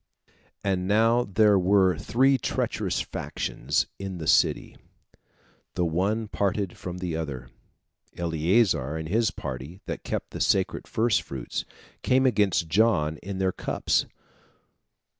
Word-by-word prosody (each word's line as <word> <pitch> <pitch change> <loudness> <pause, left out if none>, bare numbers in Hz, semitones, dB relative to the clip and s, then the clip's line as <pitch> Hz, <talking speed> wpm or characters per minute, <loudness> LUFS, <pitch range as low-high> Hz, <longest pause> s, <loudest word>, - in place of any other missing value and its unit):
And 95 -2 0
now 115 +4 +3
there 100 0 +4
were 95 0 +4
three 135 +2 +2
treacherous - - -1
factions - - -2
in 95 -2 -5
the 80 - -6
city, - - +2 1.0
the 90 - +1
one 100 +7 0
parted 100 -2 -1
from 90 0 -6
the 90 -3 -3
other. 70 -6 -5 0.7
Eleazar 85 - +1
and 80 0 -5
his 110 +2 +2
party, 70 +2 -7
that - - -5
kept - - -4
the - - -5
sacred - - +1
first 115 0 +1
fruits, 65 -3 -5 0.4
came 130 +1 +3
against 105 -8 +2
John 80 -4 +2
in 95 +3 -6
their 95 0 +1
cups. - - 0
95 Hz, 125 wpm, -26 LUFS, 80-105 Hz, 1.0 s, there